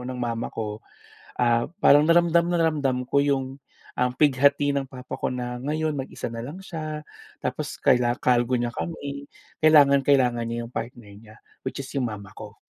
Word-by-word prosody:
ng 125 0 -6
mama 120 -1 -3
ko, 105 -1 -5 0.6
ah, 120 -1 +3 0.2
parang 145 +1 +6
na 165 - +3
ramdam 170 0 +3
na 175 - +1
ramdam 140 -6 +1
ko 140 +2 +3
yung, 135 -1 -1 0.3
um, 125 0 +1
pighati 145 0 +3
ng 135 -1 -2
papa 125 -1 -9
ko - - -2
na 125 -1 -4
ngayon 155 +2 -1
mag-isa 135 -2 -5
nalang 120 +9 -6
siya 155 -5 -6 0.3
tapos - - -4
kaila 120 0 +2
kargo 125 0 +2
niya 120 0 -2
kami. 140 -3 -6 0.3
Kailangan 145 -3 +6
kailangan 125 -4 +3
niya 120 0 -3
yung 120 - -14
partner 115 -2 -6
niya 110 +1 -15 0.3
which 130 - -5
is 135 - -6
yung 130 -4 -1
mama 100 -2 -9
ko. - - -11
130 Hz, 175 wpm, -25 LUFS, 120-145 Hz, 0.6 s, parang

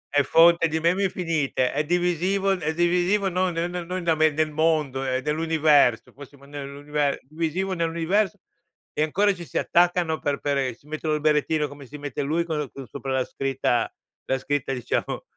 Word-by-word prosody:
È 145 - +6
fonte 165 +4 +5
di 160 0 -1
meme 175 +4 +2
infinite, 160 -8 0
è 150 +2 0
divisivo 180 +4 +1
è 160 -4 -1
divisivo 180 +4 +2
non 185 0 0
non 170 +1 -2
non 175 -1 -5
non 185 0 -3
da 170 -1 +3
me, 155 0 +4
nel 155 +1 -1
mondo, 150 -4 +1
è 130 -1 -1
dell'universo, 150 -5 +2
possiamo 140 0 -14
d - - -18
nell'unive 145 +1 -6 0.2
è - - -16
divisivo 165 +6 -2
nell'universo 170 +3 0 0.6
e - - -2
ancora 195 +6 +2
ci 175 - -9
si - - -5
attaccano 175 -2 +2
per 145 -1 -1
per 145 -1 -1
e 130 -3 -1
si 140 - -29
mettono 155 0 -2
il 150 - -3
berrettino 150 0 +2
come 145 -1 -12
si 150 +4 -9
mette 145 -3 -5
lui 155 +4 0
co 150 -4 -3
con 135 - -9
sopra 135 +1 -6
la 130 -1 +1
scritta 135 -3 -1 0.3
la 130 - 0
scritta 135 0 -2
diciamo 125 - -2
155 Hz, 190 wpm, -24 LUFS, 145-175 Hz, 0.6 s, È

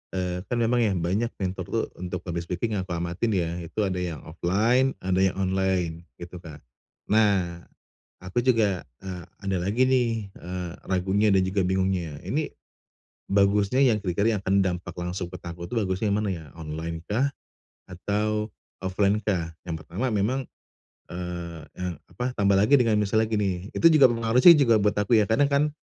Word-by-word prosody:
eee, 90 -1 -2
kan 120 - -1
memang 120 +1 +2
ya 105 -5 +2
banyak 95 +7 0
mentor 95 -1 -3
tuh - - -1
untuk 90 -1 -5
public 85 -1 -4
speaking 105 +3 -2
yang 95 - -5
aku 85 - -3
amatin 85 +6 -2
ya, 85 -1 -1
itu 85 +5 -3
ada 95 -2 -1
yang 85 -4 -4
offline 110 +11 +1
ada 95 0 +1
yang 95 -1 +2
online 95 -3 -1
gitu, 85 +1 -9
Kak. 80 -4 -12 0.5
Nah, 100 -6 +2 0.6
aku 95 +6 -1
juga, 105 - +2 0.2
eee, 90 -3 -6 0.2
ada 95 -1 0
lagi 105 +7 +2
nih, 125 -2 +3 0.2
eee, 90 -1 -6 0.2
ragunya 95 +3 +1
dan 95 - +4
juga 95 +1 0
bingungnya, 95 -5 -1
ini 150 +2 -1 0.8
bagusnya 100 +4 +3
yang 115 -5 +3
kira-kira 100 +5 +1
yang - - -6
akan 95 +1 +1
dampak 90 -2 -3
langsung 90 0 -4
ke 90 - -7
taku 85 0 -7
itu - - -6
bagusnya 100 +1 -1
yang 105 - +2
mana 105 - -1
ya? 80 -3 -8
Online-kah 80 - -2 0.6
atau 105 +4 -1 0.3
offline-kah? 95 -3 0
Yang 80 -2 -4
pertama 100 +10 -2
memang 115 +6 0 0.6
eee 85 -2 -6 0.2
eee, 90 -1 -3 0.2
apa, 125 +1 -3
tambah 100 -1 +3
lagi 110 +8 +5
dengan 110 -3 +2
misalnya 110 +2 +2
gini, 100 -3 -1
itu - - -1
juga 140 -4 +7
pengaruh 115 +2 +1
sih 175 - +11
juga 120 -6 +4
buat 105 0 +2
aku 105 +3 +3
ya. - - +2
Karena 140 +6 +4
kan, 145 +2 +2
95 Hz, 170 wpm, -26 LUFS, 90-110 Hz, 0.8 s, sih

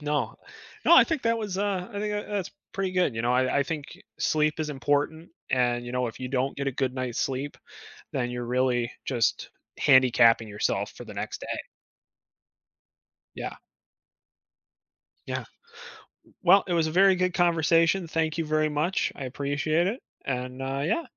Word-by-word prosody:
No. 145 -6 -1 0.5
No, 340 - +8
I - - +9
think 320 -5 -2
that 230 0 +2
was, 205 -4 -3
uh, 195 -3 -1
I 205 - -5
think 210 0 -2
that, 205 0 -3
uh, - - -7
that's 195 -4 -2 0.2
pretty 195 -1 -1
good, 180 -10 +1
you 115 - -2
know, 120 +1 +2
I 130 +2 +2
I 140 - +4
think 150 0 -4 0.3
sleep 155 0 +1
is 155 -1 -2
important 145 +4 -1 0.2
and, 120 -1 +1
you 120 - -6
know, 125 -1 0
if 115 - -10
you 130 -1 -4
don't 135 +1 -1
get 140 0 -3
a 135 - 0
good 130 0 -1
night's 130 -2 -2
sleep, 135 +2 -2 0.6
then 125 -2 -1
you're 120 0 -4
really 125 -1 +1
just 120 -4 0 0.3
handicapping 125 -4 +5
yourself 105 0 -1
for - - -9
the - - -10
next - - -5
day. - - -4 1.8
Yeah. - - -5 1.7
Yeah. - - -3 0.8
W - - -25
well, 195 +3 +6
it 175 - 0
was 165 -2 +2
a - - -3
very 190 +2 +5
good 185 0 0
conversation, 170 +1 +3
thank 160 0 -1
you 165 - -1
very 155 0 +1
much, 155 +6 0
I 135 - -6
appreciate 145 +6 0
it 230 +6 -3 0.2
and, 125 0 -3
uh, 135 +1 -2
yeah, 335 - 0
145 Hz, 180 wpm, -27 LUFS, 130-175 Hz, 1.8 s, I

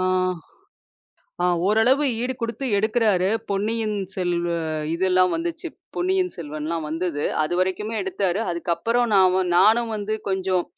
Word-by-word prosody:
அ - - 0 1.4
அ - - +4 0.2
ஓரளவு 245 +7 +3 0.2
ஈடு 255 +1 -1
குடுத்து 230 +4 -3
எடுக்குறாரு. 215 -3 +2 0.2
பொன்னியின் 215 +2 -1 0.2
செல்வ 175 -2 -1 0.4
இதெல்லாம் 185 0 +3
வந்துச்சு. 170 - -4 0.3
பொன்னியின் 370 0 0
செல்வன்லாம் 155 0 -4
வந்தது. 160 -2 -2 0.2
அதுவரைக்குமே 185 +6 -1
எடுத்தாரு. 190 0 -1
அதுக்கு 170 0 -3
அப்புறம் 235 +7 +1
நான் 190 -1 +5
வ 190 - +2 0.2
நானும் 225 +4 +4
வந்து 215 +1 -2
கொஞ்சம், 185 -2 0
190 Hz, 125 wpm, -23 LUFS, 175-225 Hz, 1.4 s, நான்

